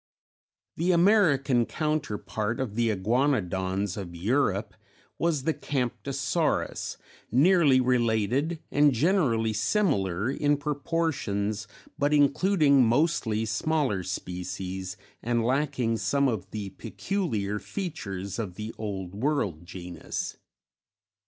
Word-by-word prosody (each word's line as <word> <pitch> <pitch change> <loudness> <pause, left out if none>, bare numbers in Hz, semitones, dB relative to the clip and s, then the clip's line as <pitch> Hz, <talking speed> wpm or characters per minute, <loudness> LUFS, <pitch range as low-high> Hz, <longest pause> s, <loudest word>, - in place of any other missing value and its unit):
_ - - - 0.7
The 175 +3 +2
American 160 - +4
counterpart 115 - -2
of 130 -6 -2
the 115 +1 +1
Iguanodons 100 -4 0
of 90 -4 -6
Europe 105 +2 0 0.5
was 165 -5 +1
the 160 - +1
Camptosaurus, 135 - -1 0.3
nearly 145 - +5
related 125 +5 +1
and 145 -1 +4
generally 125 - +2
similar 105 - +1
in 145 +1 +1
proportions 140 -9 -1 0.3
but 145 +1 +3
including 145 -1 +4
mostly 115 -3 +1
smaller 110 -1 0
species, 95 0 -5 0.2
and 120 -1 0
lacking 130 -3 +1
some 140 +4 +1
of 110 -8 -2
the 105 -2 -5
peculiar 105 - -2
features 105 - -5
of 95 -6 -4
the 110 +2 -6
Old 95 -4 -4
World 100 - -1
genus. 90 -2 -5
120 Hz, 100 wpm, -27 LUFS, 100-145 Hz, 0.7 s, nearly